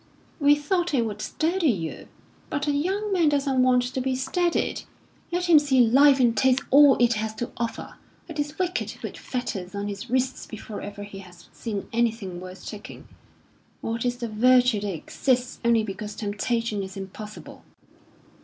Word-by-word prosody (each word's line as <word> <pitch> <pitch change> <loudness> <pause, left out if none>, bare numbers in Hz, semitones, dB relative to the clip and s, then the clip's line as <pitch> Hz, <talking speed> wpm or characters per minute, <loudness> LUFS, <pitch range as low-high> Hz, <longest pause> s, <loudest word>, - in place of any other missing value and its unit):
"We 290 0 +6
thought 340 +2 0
it 235 -3 +2
would 210 -1 -5
steady 330 - 0
you." 170 -9 -3 0.4
"But 285 0 -2
a 295 - +1
young 385 +8 -1
man 340 -5 +4
doesn't 275 -2 +1
want 250 -1 +4
to 255 +1 -3
be 260 0 0
steadied. 335 +7 0 0.5
Let 355 +1 0
him 325 -3 +8
see 280 -3 +2
life 270 +4 +6
and 240 -2 +3
taste 260 0 +3
all 285 0 +8
it 240 -1 +4
has 215 0 -3
to 240 - -4
offer. 235 -1 -5 0.3
It 320 -3 -7
is 290 +1 -3
wicked 365 0 -1
to - - -8
put - - -7
fetters 205 -7 -5
on 200 0 -3
his 205 +4 -6
wrists 260 +1 -1
before 215 -1 -8
ever 205 0 -7
he 200 -1 -9
has 180 -3 -14
seen 205 -4 -5
anything 225 -6 -1
worth 185 0 -10
taking. 210 -1 -9 0.7
What 230 0 -2
is 245 0 -1
the 240 -1 -4
virtue 245 +1 +4
that 205 -1 -2
exists 250 - -1
only 235 -1 +3
because 210 0 -6
temptation 215 +1 -1
is 190 0 -7
impossible!" 210 +2 -9
245 Hz, 175 wpm, -25 LUFS, 210-285 Hz, 0.7 s, him